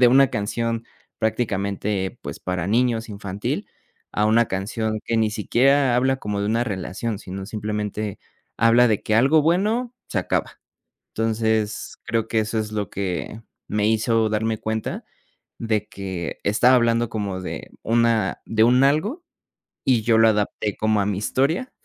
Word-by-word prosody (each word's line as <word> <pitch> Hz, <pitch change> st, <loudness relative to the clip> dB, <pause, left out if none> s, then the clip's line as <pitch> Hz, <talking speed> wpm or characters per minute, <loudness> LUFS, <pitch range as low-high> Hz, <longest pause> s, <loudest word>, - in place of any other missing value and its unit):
de 125 Hz, -, +7 dB
una 135 Hz, +1 st, +6 dB
canción 115 Hz, +1 st, -2 dB, 0.3 s
prácticamente, 100 Hz, -3 st, -1 dB
pues, -, -, -6 dB
para 90 Hz, -1 st, -3 dB
niños, 115 Hz, +1 st, +1 dB
infantil, 100 Hz, -1 st, -4 dB, 0.5 s
a 105 Hz, +1 st, +2 dB
una 115 Hz, +2 st, +4 dB
canción 110 Hz, +3 st, -2 dB
que 115 Hz, -, -1 dB
ni 110 Hz, -1 st, +2 dB
siquiera 125 Hz, +4 st, +3 dB
habla 130 Hz, +1 st, +2 dB
como 105 Hz, -4 st, -3 dB
de 100 Hz, -, -1 dB
una 115 Hz, +3 st, +1 dB
relación, 100 Hz, +1 st, -3 dB
sino 95 Hz, +1 st, -7 dB
simplemente 105 Hz, -1 st, -3 dB, 0.4 s
habla 115 Hz, +2 st, +5 dB
de 105 Hz, -2 st, +1 dB
que 110 Hz, -, 0 dB
algo 140 Hz, +7 st, +5 dB
bueno 215 Hz, +9 st, +1 dB
se 100 Hz, -, -1 dB
acaba. 90 Hz, -, -2 dB, 0.5 s
Entonces, 110 Hz, -1 st, -1 dB
creo 115 Hz, -1 st, -1 dB
que 110 Hz, -, +1 dB
eso 110 Hz, +1 st, -1 dB
es 110 Hz, 0 st, -3 dB
lo 105 Hz, -3 st, -2 dB
que 100 Hz, +3 st, -4 dB, 0.3 s
me 105 Hz, 0 st, +1 dB
hizo 110 Hz, 0 st, +2 dB
darme 110 Hz, +1 st, 0 dB
cuenta 110 Hz, 0 st, -3 dB, 0.5 s
de 110 Hz, -2 st, -1 dB
que 95 Hz, -4 st, -5 dB
estaba 110 Hz, +5 st, +4 dB
hablando 120 Hz, -1 st, +2 dB
como 100 Hz, -4 st, -3 dB
de -, -, -6 dB
una 115 Hz, -3 st, +1 dB
de 110 Hz, 0 st, +2 dB
un 125 Hz, +3 st, +5 dB
algo 200 Hz, -, +1 dB, 0.6 s
y 125 Hz, -4 st, +3 dB
yo 115 Hz, -1 st, +3 dB
lo 115 Hz, -, +6 dB
adapté 105 Hz, -1 st, 0 dB
como 110 Hz, -1 st, +2 dB
a -, -, 0 dB
mi 100 Hz, -2 st, -1 dB
historia 145 Hz, -, 0 dB
110 Hz, 155 wpm, -23 LUFS, 105-120 Hz, 0.6 s, de